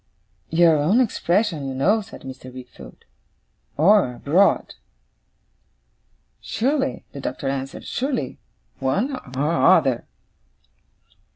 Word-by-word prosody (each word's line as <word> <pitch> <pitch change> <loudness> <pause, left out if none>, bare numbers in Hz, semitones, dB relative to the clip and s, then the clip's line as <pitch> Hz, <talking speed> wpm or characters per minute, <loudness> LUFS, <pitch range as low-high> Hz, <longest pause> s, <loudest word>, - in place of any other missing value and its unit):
'Your 165 -1 +4
own 165 +11 +3
expression, 180 - 0
you 135 - -4
know,' 200 +12 +2
said 200 - -12
Mr. 130 -1 -9
Wickfield. 130 0 -13 0.7
'Or 165 -5 +4
abroad.' 175 +11 +2 1.7
'Surely,' 270 +3 -1
the 140 - -8
Doctor 135 +1 -4
answered. 135 0 -4
'Surely. 250 - -3 0.4
One 200 - 0 0.2
or 150 +5 +1
other. 140 -10 +3
160 Hz, 95 wpm, -22 LUFS, 135-210 Hz, 1.7 s, Your